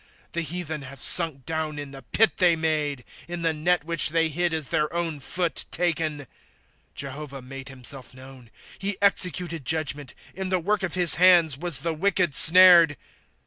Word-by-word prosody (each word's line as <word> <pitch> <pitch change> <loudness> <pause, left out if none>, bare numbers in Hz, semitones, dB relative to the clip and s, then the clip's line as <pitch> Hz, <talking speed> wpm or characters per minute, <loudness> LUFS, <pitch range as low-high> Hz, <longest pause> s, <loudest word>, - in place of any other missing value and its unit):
^^ - - -42
The 170 - -4
heathen 160 -2 -6
have 140 0 -11
sunk 160 -5 +5
down 160 -2 -5
in 145 -1 -8
the 135 -1 -12
pit 205 - 0
they 175 -3 +3
made; 150 -4 -3 0.2
In 175 -1 -6
the 165 -1 0
net 170 +2 -1
which 165 -1 -1
they 165 0 0
hid 175 +3 -2
is 160 -4 -4
their 150 0 -1
own 170 -3 -3
foot 175 +5 -4
taken. 165 -3 -2
^'^ 140 - -15 0.7
Jehovah 140 0 -7
made 135 +1 -10
himself 130 0 -8
known; 130 -2 -15 0.3
he 195 0 -3
executed 180 -5 -2
judgment; 145 -1 -3 0.2
In 190 -1 -5
the 185 - +1
work 200 +4 -2
of 185 -3 -3
his 175 -5 +5
hands 175 -5 +5
was 155 -2 -1
the 165 +1 -3
wicked 180 -1 -1
snared. 170 -2 +7
160 Hz, 180 wpm, -23 LUFS, 140-175 Hz, 0.7 s, snared